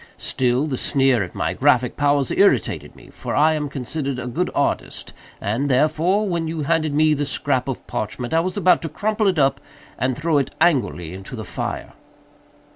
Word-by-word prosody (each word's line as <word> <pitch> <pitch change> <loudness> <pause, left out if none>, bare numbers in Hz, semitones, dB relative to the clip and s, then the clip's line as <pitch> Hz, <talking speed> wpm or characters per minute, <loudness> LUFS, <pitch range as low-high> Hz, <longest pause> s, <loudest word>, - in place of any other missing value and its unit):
Still, 125 +2 0
the 140 -4 -2
sneer 135 -4 +3
at 90 - -5
my - - -1
graphic 125 -1 +2
powers 145 -2 +1
irritated - - +2
me—for - - -7
I 155 +2 +4
am 150 -2 -2
considered 135 +1 -3
a 130 - -5
good 125 - -1
artist—and, 120 +8 -3
therefore, 155 +10 +2
when 170 -3 -1
you 160 -1 -3
handed 155 0 +1
me 155 0 +4
the 145 0 -1
scrap 140 -3 -1
of 135 - -4
parchment, 120 +5 -4
I 165 - +4
was 185 +4 -2
about 185 -2 +4
to 165 - -4
crumple 215 +6 0
it 185 -3 +1
up 135 -2 +2 0.4
and 130 -1 0
throw 155 -1 +2
it 135 - -3
angrily 130 - +1
into 95 +6 -8
the 110 -3 -6
fire." - - -5
145 Hz, 180 wpm, -21 LUFS, 125-160 Hz, 0.4 s, I